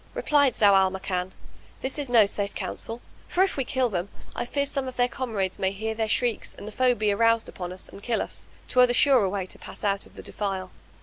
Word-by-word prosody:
Replied 285 -4 +3
Zau 205 -2 +5
al 190 -1 +5
Makan, 185 -1 -3 0.5
"This 265 +3 -1
is 280 -3 -2
no 230 -3 +6
safe 200 0 -2
counsel 230 +2 -3 0.3
for 370 - +3
if 390 - 0
we 270 - 0
kill 255 0 +1
them, 185 -3 -3 0.3
I - - -2
fear 280 +3 -1
some 275 -1 -1
of 255 - -6
their 245 0 +3
comrades 220 -7 -3
may 190 0 +1
hear 220 +3 -3
their 220 0 -1
shrieks 235 +1 0
and 205 - -9
the - - -6
foe 250 +2 +3
be 215 -2 +1
aroused 230 +2 +3
upon 180 -1 -6
us 185 - -8
and 200 - -12
kill 230 +1 0
us. - - -7 0.2
'Twere 250 0 +5
the 245 - 0
surer 250 -7 +5
way 190 -1 -2
to - - -11
pass - - -9
out 200 -1 0
of - - -22
the - - -9
defile." 190 -2 -3
220 Hz, 240 wpm, -26 LUFS, 195-250 Hz, 0.5 s, no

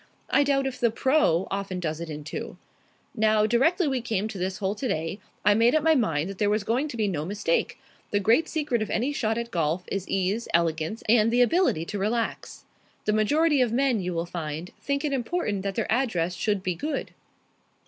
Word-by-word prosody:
I - - +5
doubt 275 -1 +1
if 260 -2 -4
the 235 - +3
'pro.' 245 - +2
often 195 -2 -3
does 160 -2 -3
it 170 - -5
in 150 -1 -6
two. 150 - -6 0.6
Now, 215 -1 +3
directly 300 - +2
we 265 -3 0
came 220 -3 -1
to 200 - -7
this 185 +1 -2
hole 195 -1 -1
today, 195 - -3 0.3
I 205 - +6
made 230 +6 +4
up 310 - +2
my 320 0 +5
mind 165 - +1
that 195 -1 -7
there 205 - +2
was 210 0 +1
going 245 +8 0
to 250 - -7
be 215 -2 +1
no 165 -7 -2
mistake. 210 - -1 0.3
The 205 - +1
great 230 - +3
secret 295 -8 -1
of 215 - -2
any 255 +6 0
shot 225 -4 0
at 235 0 -4
golf 165 0 0
is 195 -1 -3
ease, 195 +4 0
elegance, 165 +4 0
and 220 0 +5
the 245 +1 +4
ability 245 - +2
to 205 +3 -4
relax. 225 +3 -2 0.4
The 210 - +2
majority 290 +7 +3
of 245 -3 +2
men, 255 -1 +2
you 180 0 -3
will 165 +1 -1
find, 165 0 -5
think 280 +1 -1
it 290 - -1
important 245 - -1
that 195 0 -3
their 225 - -2
address 220 -9 +1
should 200 +2 -1
be 185 - 0
good." 285 - -4
215 Hz, 210 wpm, -26 LUFS, 185-255 Hz, 0.6 s, I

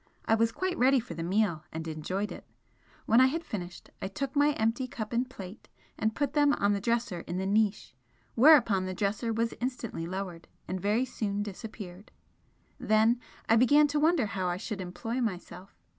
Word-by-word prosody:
I - - +2
was 225 0 +3
quite 370 +4 -2
ready 265 +1 +5
for 225 -7 -7
the 165 - -6
meal, 175 -2 0
and 160 +1 -5
enjoyed 185 +6 -3
it. - - -8 0.6
When 230 +3 +5
I 260 - +7
had 325 +5 -2
finished, 180 - -7
I - - -2
took 265 +8 -4
my 290 +1 +4
empty 230 +2 0
cup 235 -4 -6
and 245 +2 0
plate 195 -4 -10 0.3
and 220 0 -1
put 285 0 -1
them 290 -1 +4
on 205 -4 +2
the 200 - -2
dresser 230 -5 0
in 175 - -3
the 190 - -2
niche, 210 -3 +1 0.4
whereupon 235 -8 +6
the 185 - -4
dresser 205 +4 -1
was 230 +1 0
instantly 240 -9 -3
lowered, 180 -2 -5 0.2
and 185 0 -3
very 210 +6 +1
soon 205 -4 -2
disappeared. 205 -2 -8 0.7
Then 220 +2 +3 0.3
I 225 - +5
began 285 +5 +6
to 295 +1 0
wonder 315 -4 +3
how 195 -3 -2
I 175 0 -1
should 200 0 -5
employ 205 +8 -4
myself. 185 -3 -5
215 Hz, 190 wpm, -29 LUFS, 190-250 Hz, 0.7 s, I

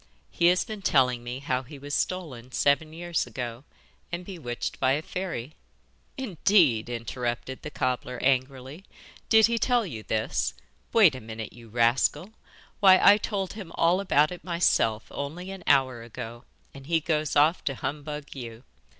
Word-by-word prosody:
He 170 - +3
has 180 +1 +3
been 215 -2 -7
telling 125 -8 +2
me 120 +1 -5
how 130 -2 -1
he 140 +3 -11
was 145 +1 -8
stolen 140 -11 -3
seven 145 +2 +2
years 170 -3 -2
ago, 120 +2 -6 0.5
and 175 +1 -4
bewitched 150 -11 -5
by 130 - +3
a 145 - 0
fairy.' 160 -8 -5 0.6
'Indeed!' 175 - +2
interrupted 120 +2 -4
the - - -6
cobbler 125 -2 -2
angrily. 130 +4 -1 0.5
'Did 220 -1 +7
he 235 0 0
tell 245 -2 +2
you 120 - -6
this? 110 - -1 0.4
Wait 200 -10 +6
a 130 - -7
minute, 110 0 -7
you 115 -1 -14
rascal! 120 - +1 0.5
Why 190 -2 +7
I 205 +1 +7
told 200 -3 -3
him 200 -6 -9
all 170 +3 +3
about 155 -6 +3
it 180 - -8
myself 140 -11 +1
only 170 +7 -5
an 190 -2 -9
hour 130 -4 +3
ago, 115 0 -8 0.3
and 135 -1 -12
then - - -14
he 165 -1 +3
goes 155 -2 -1
off 150 +4 +4
to 135 - -1
humbug 150 +2 -5
you. 120 -2 -8
145 Hz, 165 wpm, -27 LUFS, 120-175 Hz, 0.6 s, Did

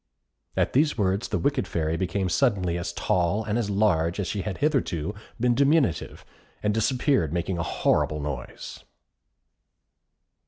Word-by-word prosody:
At - - +1
these 150 +1 +3
words 100 0 0
the - - -1
wicked 140 -2 0
Fairy 80 -1 -1
became 95 +2 -1
suddenly 95 -6 +1
as 85 0 -3
tall 90 +3 0
and 105 0 -2
as 105 -4 -2
large 95 -4 +1
as 100 - 0
she 100 +4 -2
had 100 0 -4
hitherto 110 - 0 0.3
been 120 +1 +3
diminutive, 140 - +1 0.4
and 105 0 +2
disappeared 125 - +1
making 85 +1 -2
a - - +1
horrible 75 -2 +1
noise. 70 -4 -6
100 Hz, 145 wpm, -26 LUFS, 85-120 Hz, 0.4 s, these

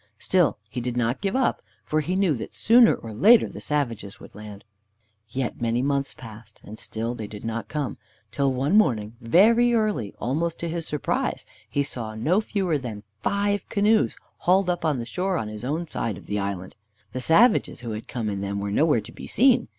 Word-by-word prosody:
Still 180 - +2
he 120 +4 -5
did 125 0 -3
not 120 +1 0
give 195 +1 -1
up, 260 -1 +1 0.2
for 155 +6 +1
he 175 +5 -2
knew 190 -4 +3
that 120 - -6
sooner 235 +1 +6
or 115 -1 -9
later 220 - +6
the - - -9
savages 115 -9 -2
would - - -13
land 105 -1 -10 0.7
again. 130 +4 -3
Yet 120 - -5
many 120 +1 +1
months 140 0 -1
passed, 110 -2 -12
and 110 +2 -10
still 115 +2 -3
they 110 -3 -6
did 105 +1 -9
not 115 0 -3
come, 150 -3 -3 0.3
till 140 +2 +1
one 135 +8 +1
morning, 115 - +2
very 230 - +5
early, 210 - 0
almost 160 +6 -1
to 170 - -2
his 165 0 -3
surprise, 150 -2 -2 0.2
he 145 - +1
saw 115 -6 -4
no 160 - +2
fewer 190 -8 -1
than 110 -5 -7 0.2
five 200 - 0
canoes 215 +2 +2 0.2
hauled 185 +1 +3
up 175 - -3
on 155 -4 +1
the 120 - -4
shore 180 +9 -1
on 110 - -3
his 105 +1 -8
own 155 +7 -2
side 115 - -3
of - - -13
the 105 0 -2
island. 100 -2 -4 0.4
The 130 - -4
savages 205 - +4
who 120 -2 -5
had 110 +1 -6
come 115 -3 -3
in 100 -2 -2
them 100 0 -3
were 100 0 -3
nowhere 145 +1 +3
to - - -12
be - - -10
seen. 255 +3 +4
135 Hz, 205 wpm, -25 LUFS, 110-180 Hz, 0.7 s, sooner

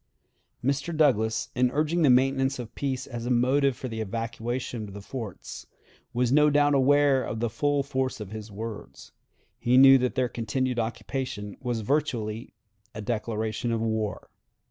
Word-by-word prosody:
Mr. 140 +4 -1
Douglas, 110 -8 +2
in 125 0 +2
urging 155 +5 0
the 150 - +5
maintenance 135 +1 +3
of 120 -3 -7
peace 135 -2 -3
as 120 -2 -6
a - - -1
motive 130 +2 +2
for 130 - -5
the 110 -2 -4
evacuation 115 +1 -4
of 100 - -11
the 100 - -7
forts, 110 -6 -7 0.4
was 125 0 0
no 150 +2 +5
doubt 145 0 +3
aware 140 0 +4
of 110 - -4
the 115 -1 -1
full 145 +4 +1
force 130 -2 -2
of 105 -2 -7
his 110 0 -7
words. 110 +1 -8 0.5
He 125 +2 +3
knew 135 0 +9
that 125 0 -1
their 130 -2 +2
continued 120 +2 -2
occupation 115 -2 -4
was 120 -3 -2
virtually 115 -4 -1 0.4
a 110 - -5
declaration 110 +1 -2
of 115 - 0
war. 110 -2 -2
125 Hz, 165 wpm, -27 LUFS, 110-135 Hz, 0.5 s, knew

